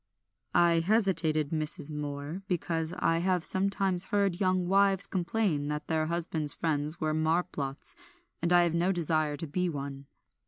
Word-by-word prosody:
"I 170 -1 +5
hesitated, 165 -6 +1
Mrs. 155 -1 -2
Moor, 145 +3 -5
because 165 -3 -1
I 165 0 +2
have 180 -1 +1
sometimes 190 -1 +1
heard 200 -2 0
young 185 -1 +2
wives 195 0 +3
complain 175 -5 -1
that 150 0 -3
their 155 -1 0
husbands' 165 -3 -2
friends 155 0 -1
were 155 -1 0
marplots, 155 -3 -1 0.5
and 170 +1 0
I 175 0 +6
have 170 -2 0
no 175 +3 +2
desire 155 -4 0
to 165 - -4
be 180 +4 -1
one." 140 -2 -6
165 Hz, 150 wpm, -29 LUFS, 155-180 Hz, 0.5 s, I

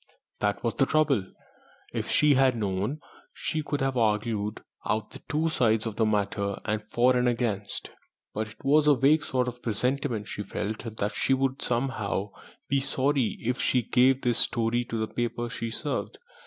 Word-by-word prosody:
That 105 -1 0
was 115 - 0
the 135 - +2
trouble! 140 -11 +2 0.6
If - - -3
she 150 -1 +5
had 130 -1 +4
known, 105 +8 -2 0.3
she 155 - -2
could 145 -1 -3
have 135 -1 0
argued 105 -2 0 0.2
out 110 0 -1
the - - -11
two 155 +2 +1
sides 110 -7 +2
of 110 -2 -4
the 110 - +3
matter, 100 -1 0 0.3
for 125 +3 +3
and 125 0 +2
against. 115 -5 -2 0.4
But 110 +1 -2
it 110 - -15
was 150 +2 +4
only 145 -2 +6
a - - -12
vague 145 +3 +5
sort 125 -1 0
of 125 0 -6
presentiment 115 -1 -1
she 110 - -5
felt, 110 +3 -4
that 100 +1 0
she 135 - +1
would 135 +1 -1
somehow 120 -5 -1 0.4
be 140 - +2
sorry 135 -2 +1
if 125 +2 -1
she 125 -2 +2
gave 130 +3 +3
this 120 -2 +2
story 120 +1 +1
to 115 - -4
the 110 0 -1
paper 120 0 -2
she 115 -2 -4
served. 110 - -3
120 Hz, 180 wpm, -27 LUFS, 110-135 Hz, 0.6 s, only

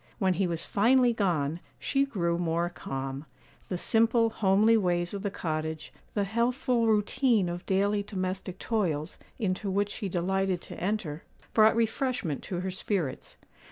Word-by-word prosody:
When 190 -2 +2
he 190 +1 +1
was 170 -2 -2
finally 245 +3 +4
gone, 170 -7 0 0.2
she 275 0 +1
grew 170 -9 -1
more 170 0 0
calm. 135 -2 -5 0.4
The 180 - -1
simple, 230 +3 +3
homely 210 +2 +4
ways 175 -4 +1
of 200 - -4
the 205 - -1
cottage, 160 -3 -4 0.2
the 205 - +2
healthful 235 +2 +1
routine 220 0 +2
of 175 +1 -5
daily 200 +2 +2
domestic 185 -2 -4
toils, 180 -9 -1 0.2
into 200 -2 -1
which 200 +1 0
she 205 -3 -4
delighted 190 +1 0
to - - -8
enter, 180 -6 -2 0.3
brought 220 0 +6
refreshment 230 - 0
to 180 -2 -3
her 190 0 -2
spirits. 180 -7 -3
195 Hz, 150 wpm, -28 LUFS, 175-220 Hz, 0.4 s, brought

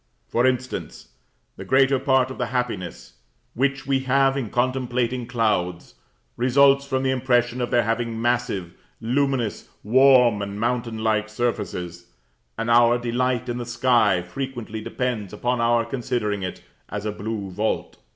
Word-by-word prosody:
For 120 +2 +2
instance, 130 0 -3 0.5
the - - -7
greater 135 0 +3
part 130 -1 +2
of 130 - -9
the 125 - -1
happiness 95 - -4 0.3
which 140 +2 0
we 135 -1 +1
have 135 +1 +2
in 130 -6 -3
contemplating 125 0 -1
clouds, 105 -8 -1 0.4
results 140 +3 +4
from 130 -1 -1
the 130 - +1
impression 125 -1 +1
of 120 - -1
their 120 -1 +3
having 115 0 -2
massive, 120 -7 -1 0.3
luminous, 125 -1 -1
warm, 125 -2 +5
and 100 0 -5
mountain 120 -1 -1
like 110 -1 +1
surfaces; 90 -7 -3 0.5
and 115 - -2
our 120 0 +5
delight 125 +1 -1
in 120 0 -3
the - - -3
sky 115 -7 +2
frequently 120 +2 -6
depends 115 -4 -3
upon 120 0 -1
our 115 0 +2
considering 115 -4 -2
it 90 -1 -6 0.3
as 105 0 -5
a 105 - -1
blue 105 -2 -5
vault. 105 +4 -2
120 Hz, 145 wpm, -23 LUFS, 110-130 Hz, 0.5 s, warm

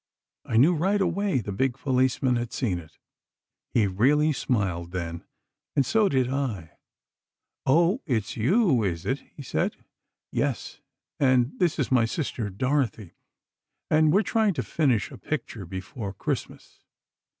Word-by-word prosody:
I 110 - 0
knew 150 +9 +6
right 190 +6 +1
away 190 -5 +1
the 100 - -5
big 130 +6 0
policeman 130 -1 +1
had 120 -1 -2
seen 100 -10 -1
it. 80 -2 -15 0.7
He 110 - +3
really 140 +11 +3
smiled, 95 -10 -1
then, 85 -2 -4 0.5
and 140 -3 +3
so 215 - +3
did 130 -2 +2
I. 125 - -3 0.9
'Oh, 170 - +4
it's 110 -7 -1
you, 145 - +3
is 85 -4 -2
it?' 135 +2 0 0.2
he 145 - -8
said. - - -1 0.6
'Yes, - - -2 0.4
and 130 -2 +3
this 175 -4 +2
is 140 - -1
my 120 -3 +4
sister, 115 -4 -3
Dorothy, 115 - -1 0.8
and 155 0 +5
we're 200 +6 +4
trying 215 -1 +1
to - - -1
finish 130 -9 +1
a - - -10
picture 115 - -4
before 95 +3 -6
Christmas. - - -5
130 Hz, 140 wpm, -26 LUFS, 105-155 Hz, 0.9 s, knew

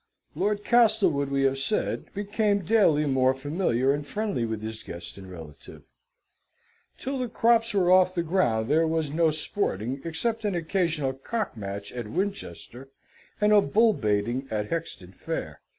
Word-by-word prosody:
Lord 205 0 -1
Castlewood, 190 - +3
we 140 0 +1
have 135 0 +1
said, 210 +10 -2
became 205 -1 0
daily 165 -7 +4
more 130 -1 +2
familiar 135 -2 0
and 145 +1 -3
friendly 200 - -2
with 110 -1 -4
his 110 0 -5
guest 85 -4 -8
and 95 -1 -11
relative. 80 -5 -11 1.1
Till 270 +1 -4
the 250 -2 -2
crops 230 0 +2
were 180 -2 +3
off 185 0 +5
the 170 - 0
ground 155 -11 +1
there 160 +4 +3
was 160 -2 -1
no 165 +1 +3
sporting, 135 - -2
except 225 +8 -2
an 205 -3 0
occasional 165 -5 0
cock 210 - -4
match 100 -1 -6
at 120 -3 -6
Winchester, 135 - -5 0.5
and 210 0 +4
a 205 - +7
bull 220 +7 +3
baiting 115 - -1
at 105 -1 -3
Hexton 160 - -4
Fair. - - -5
155 Hz, 155 wpm, -26 LUFS, 120-205 Hz, 1.1 s, a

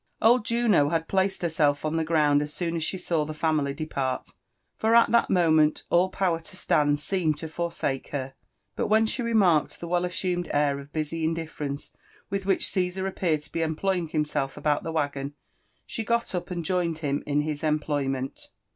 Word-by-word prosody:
Old 235 0 +4
Juno 230 -11 +3
had 165 0 -1
placed 190 -1 0
herself 155 -3 +1
on 155 +1 -1
the 165 - +1
ground 150 -3 +3
as 150 0 -4
soon 165 +2 -2
as 165 - -1
she 190 - -2
saw 170 -3 0
the 155 +1 -6
family 150 -3 +1
depart, 140 -4 -3 0.4
for 225 +1 +2
at 235 - +6
that 235 - +4
moment 160 -4 +3
all 180 +2 +4
power 185 -3 0
to 165 +3 -12
stand 145 -3 +2
seemed 160 -2 -1
lo - - -3
for 170 +2 -3
sake 135 -5 -2
her; 135 -2 -4 0.4
but - - -1
when 220 +1 +4
she 250 +3 -2
remarked 200 -10 +2
the 170 - -6
well 175 +1 +1
assumed 180 -1 -2
air 145 -1 +2
of 140 +1 -12
busy 160 +1 -3
indiT 160 0 -1
ference 140 -1 -5 0.4
with 195 -1 -2
which 195 - +2
Caesar 185 0 -1
appeared 170 -5 0
to - - -14
be 165 - -2
employing 170 +2 0
himself 150 -3 -1
about 150 0 +1
Ihe - - -2
waggon, 145 -3 -2 0.5
she 225 - -4
got 235 0 0
up 180 +1 -3
and 175 -2 -4
joined 170 -2 0
him 140 0 0
in 145 0 +2
his 150 0 -4
employment. 145 -4 -1
160 Hz, 195 wpm, -26 LUFS, 150-180 Hz, 0.5 s, at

